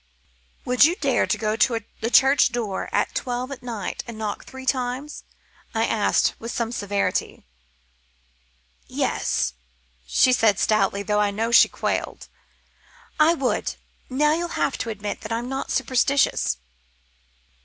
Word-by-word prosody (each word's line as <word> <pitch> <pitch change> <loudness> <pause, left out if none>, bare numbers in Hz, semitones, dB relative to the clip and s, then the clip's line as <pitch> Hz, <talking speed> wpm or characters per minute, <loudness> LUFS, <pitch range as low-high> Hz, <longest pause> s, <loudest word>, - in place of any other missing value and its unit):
"Would 250 +1 +4
you 330 +4 +5
dare 275 -7 +1
to 215 - 0
go 215 0 -1
to 230 +1 +2 0.2
the 230 - -1
church 270 +1 +5
door 225 -5 -3
at - - 0
twelve 250 +1 -3
at 275 - -7
night 235 -4 -5
and 230 -2 -8
knock 215 -2 -4
three 265 0 -10
times?" 260 +3 -2 0.5
I - - +2
asked, - - +2
with 230 +1 -5
some 235 -1 -2
severity. 205 - -2 1.4
"Yes," - - -1 0.5
she 255 - +4
said 220 -5 +3
stoutly, 200 -2 +1
though 210 +1 0
I 205 - +2
know 225 +3 -2
she 235 - +7
quailed, - - -3 0.9
"I 320 +2 +5
would. 270 -5 -1 0.3
Now 300 +4 +2
you'll 340 +2 -2
admit 210 -3 -3
that 215 - -7
I'm 235 +2 -2
not 270 +1 -4
superstitious." 265 - +1
240 Hz, 135 wpm, -23 LUFS, 215-265 Hz, 1.4 s, she